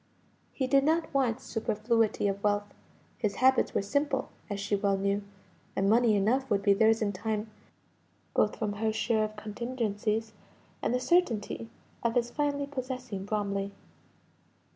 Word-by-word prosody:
He 265 - -1
did 275 +1 +4
not 320 +1 +1
want 255 -4 +2
superfluity 225 -2 0
of 200 0 -2
wealth; 205 0 0 0.5
his 210 -3 0
habits 260 +1 +3
were - - +2
simple, 275 +5 0 0.2
as 200 -1 -3
she 200 +1 0
well 200 -1 +1
knew; 200 +1 0 0.5
and 195 - +1
money 225 +1 +5
enough 245 +7 +1
would 200 -2 +1
be 200 - +5
theirs 220 +2 +4
in 205 - +1
time, 215 +2 -3 0.8
both - - +2
from 210 -3 -2
her 220 -1 +2
share 220 0 +1
of 215 0 -3
contingencies, 220 0 -2 0.5
and - - 0
the 250 - +1
certainty 245 - +1 0.3
of 235 -1 0
his 240 -1 +1
finally 285 -1 0
possessing 255 -7 -5
Bromley. 200 -1 -2
220 Hz, 150 wpm, -29 LUFS, 205-255 Hz, 0.8 s, money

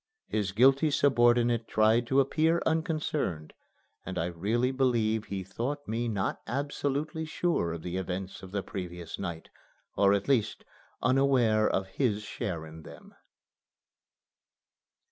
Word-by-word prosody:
His 105 -2 -1
guilty 135 +8 +4
subordinate 120 -4 +3
tried 110 +2 +3
to 135 +2 +3
appear 160 +5 +2
unconcerned, 155 - -1 0.5
and 95 0 -6
I 85 - 0
really 105 +9 0
believe 115 -5 +1
he 95 -2 -4
thought 125 +10 -4
me 115 +2 -1
not 100 -4 -2
absolutely 145 +3 -2
sure 160 - -1
of 85 - -7
the 90 +1 -3
events 95 0 -4
of 95 - -10
the 100 -1 -2
previous 90 -3 -6
night, 85 -4 -6 0.4
or 100 0 +4
at 100 - -2
least 130 -6 +1 0.4
unaware 125 -4 +3
of 95 - 0
his 105 +1 -1
share 85 -6 -4
in 80 +1 -11
them. - - -13
110 Hz, 130 wpm, -29 LUFS, 95-135 Hz, 0.5 s, guilty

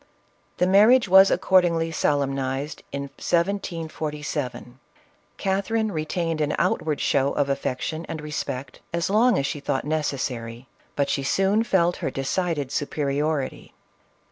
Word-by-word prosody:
The 180 - +3
marriage 210 +6 +5
was 190 +1 +7
accordingly 170 -3 +2
solemnized 140 -2 -1
in 140 0 -3
1747. 155 -5 -3 0.6
Catherine 200 +3 0
retained 165 0 -2
an 150 -1 0
outward 155 -2 0
show 140 0 +1
of 140 -1 0
affection 140 +4 -3
and 160 - -4
respect, 140 -3 -5
as 170 +2 -1
long 225 +1 +4
as 135 - 0
she 145 - -3
thought 135 -1 -2
necessary, 130 -6 -3 0.3
but 140 -1 +1
she 140 0 -1
soon 195 +9 +2
felt 180 -5 +2
her - - -2
decided 145 0 -2
superiority. 145 0 -2
155 Hz, 120 wpm, -24 LUFS, 140-180 Hz, 0.6 s, was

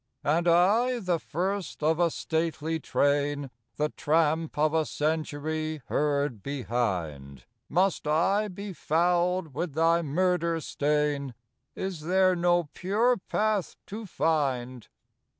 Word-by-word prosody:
" - - -51
And 165 +4 +1
I, 210 +9 +4
the 180 -7 0
first 185 +1 -3
of 160 +2 +2
a 170 -1 +4
stately 160 0 -2
train, 145 -1 0 0.2
The 150 +1 0
tramp 160 +1 0
of 155 +1 +2
a 160 -1 +3
century 155 0 -2
heard 140 -6 0
behind, 90 - -3 0.2
Must 180 -1 +1
I 190 +8 +2
be 200 +1 -7
fouled 175 +1 +1
with 165 +2 -3
thy 165 +1 +3
murder 170 +1 +1
stain? 145 -3 -1 0.4
Is 190 -3 -4
there 185 +3 +3
no 175 0 +3
pure 220 +7 +2
path 210 0 -1
to 215 +1 -7
find? 130 - -1
160 Hz, 120 wpm, -28 LUFS, 145-180 Hz, 0.4 s, I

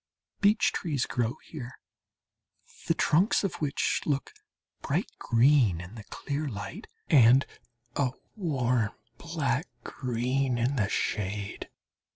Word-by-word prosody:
Beech 210 +2 +4
trees 145 -7 -1
grow 120 +1 -1
here, 130 -6 -8 1.1
the - - +3
trunks 180 +9 +3
of 195 - -1
which 145 -2 0
look 140 -2 -1 0.5
bright - - -1
green 120 - +4
in 90 +4 -9
the 110 -2 -9
clear 145 +7 -4
light 100 -4 -7 0.2
and 130 0 +6 0.5
a 140 -3 +2 0.3
warm 125 - 0 0.3
black 155 -3 -1 0.2
green 125 +1 -1
in 125 +4 +1
the 105 -5 +1
shade. 105 -1 -2
130 Hz, 115 wpm, -28 LUFS, 115-150 Hz, 1.1 s, and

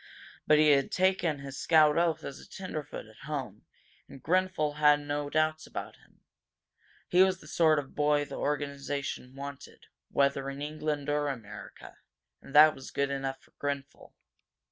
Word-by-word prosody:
But 155 - +6
he 155 0 +5
had 140 -1 +2
taken 185 -4 +1
his 135 -1 -8
scout 155 -2 +5
oath 170 -1 +1
as 140 - -7
a - - -15
tenderfoot 155 -10 -6
at 110 +6 -15
home, 130 -9 -5 0.4
and 135 -2 -13
Grenfel 175 -4 +1
had 150 -1 +5
no 145 0 -3
doubts 155 +1 0
about - - -7
him. - - -27 0.9
He 180 - +4
was 190 -1 +3
the - - -16
sort 160 -2 +3
of 140 -2 -4
boy 150 0 +2
the - - -11
organization 140 -2 -3
wanted, 140 0 -9 0.2
whether 140 -1 +1
in 140 0 -7
England 150 -1 -3
or 145 0 0
America, 115 -7 -8 0.4
and 140 - -12
that 155 +1 +9
was 135 - -10
enough 135 -1 -2
for - - -24
Grenfel. 140 -1 -5
145 Hz, 160 wpm, -29 LUFS, 140-155 Hz, 0.9 s, that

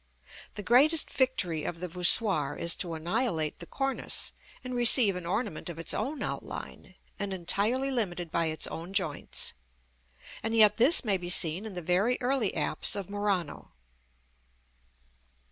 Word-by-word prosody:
The 205 - -7
greatest 280 - +3
victory 180 - -1
of 170 - -6
the 180 - -5
voussoir 175 -4 +4
is 170 0 +1
to 170 -2 -4
annihilate 165 - -3
the 170 - -10
cornice, 270 -1 -2 0.3
and 255 0 -7
receive 240 -4 +5
an 180 -2 -7
ornament 185 -3 -4
of 170 - -8
its 165 - +1
own 270 +7 -4
outline, - - -8 0.2
and 200 -1 -4
entirely 210 +9 -1
limited 180 -9 -3
by 170 -1 -1
its 155 0 -3
own 170 +4 -8
joints: 175 -7 -2 0.9
and 225 0 -3
yet 210 -2 +5
this 255 +4 +5
may 200 -3 +1
be 175 -1 -8
seen 175 +4 +5
in 200 - -10
the 180 - -7
very 195 +9 0
early 250 -4 -1
apse - - +1
of 200 -1 -7
Murano. 200 -6 -4
195 Hz, 150 wpm, -27 LUFS, 170-240 Hz, 0.9 s, receive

